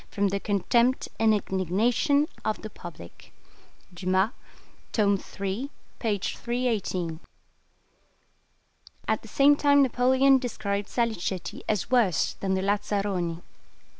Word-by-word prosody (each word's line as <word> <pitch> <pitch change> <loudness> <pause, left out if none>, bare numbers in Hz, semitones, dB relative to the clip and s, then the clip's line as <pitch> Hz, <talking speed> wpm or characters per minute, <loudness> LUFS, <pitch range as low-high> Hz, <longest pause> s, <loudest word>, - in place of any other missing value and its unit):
from 200 -1 0
the 200 +1 -1
contempt 235 +6 +1
and 225 -1 +4
indignation 215 - +1 0.2
of 215 - -2
the 215 - -6
public" 160 - -12 0.6
(Dumas, 185 +4 +1 0.6
tome 200 -3 +2 0.2
iii. 200 +8 -2 0.3
p. 215 -4 0
318). 200 -7 -2 1.9
At - - +1
the - - -13
same 285 +1 +5
time 285 -1 +4
Napoleon 260 +2 +4
described 205 -5 -3
Salicetti 215 -6 -2
as 210 +3 -1
worse 230 -9 +2
than 190 -1 0
the 190 - -1
lazzaroni. 195 -4 -1
205 Hz, 105 wpm, -27 LUFS, 190-245 Hz, 1.9 s, same